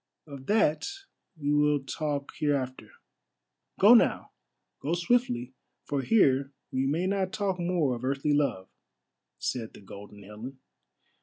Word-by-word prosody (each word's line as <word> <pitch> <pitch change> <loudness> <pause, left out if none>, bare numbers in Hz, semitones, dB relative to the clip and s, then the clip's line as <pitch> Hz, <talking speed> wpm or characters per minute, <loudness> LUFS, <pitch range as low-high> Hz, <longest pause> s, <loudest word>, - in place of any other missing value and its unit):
"Of 140 -3 -10
that 210 -8 +2 0.5
we 145 -1 0
will 150 -1 +3
talk 145 0 -3
hereafter. 135 -4 -1 0.9
Go - - +8
now! - - +3 0.5
Go 160 +4 -1
swiftly, 175 - 0 0.3
for 140 -1 -2
here 135 -8 +3 0.2
we 130 +1 0
may 160 +6 0
not 190 -1 0
talk 195 -3 -1
more 170 -6 +1
of 120 0 -6
earthly 140 +3 0
love," 135 -11 0 0.7
said 115 -3 -4
the - - -13
Golden 100 +1 -12
Helen. 110 +7 -9
140 Hz, 130 wpm, -28 LUFS, 130-170 Hz, 0.9 s, Go